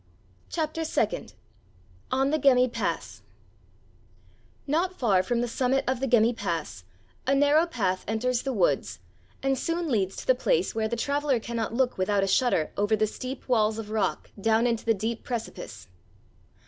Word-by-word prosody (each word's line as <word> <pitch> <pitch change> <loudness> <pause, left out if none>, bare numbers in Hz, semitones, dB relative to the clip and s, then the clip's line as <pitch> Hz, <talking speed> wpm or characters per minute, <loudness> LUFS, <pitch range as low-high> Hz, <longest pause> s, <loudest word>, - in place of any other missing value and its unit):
*CHAPTER 320 0 -2
SECOND* 270 -8 -1 0.8
*ON 270 +2 +2
THE 310 - +1
GEMMI 255 -3 +5
PASS* - - -3 1.4
Not 345 +6 0
far 200 -7 +3
from 235 +5 -1
the 240 - 0
summit 260 +3 +1
of 260 -1 0
the 270 - -1
Gemmi 235 -1 +4
pass 165 - -4 0.4
a 275 - +4
narrow 290 +4 +4
path 190 - -1
enters 235 +3 0
the 270 - -2
woods 200 -8 +1 0.5
and 270 -1 +1
soon 335 +2 -1
leads 195 -6 0
to - - -7
the - - +5
place - - +1
where 220 -1 0
the 235 - -2
traveler 280 +1 0
cannot 230 0 -3
look 255 -4 +1
without 195 +1 +2
a - - +1
shudder 195 -7 +2
over 205 +2 +2
the 215 0 +2
steep 255 +5 -7
walls 220 -3 +2
of 215 -1 -6
rock 220 -1 -1
down 225 +2 +3
into 230 -2 0
the 225 -1 +3
deep 220 +3 -3
precipice. 235 -2 -6
240 Hz, 165 wpm, -27 LUFS, 215-270 Hz, 1.4 s, GEMMI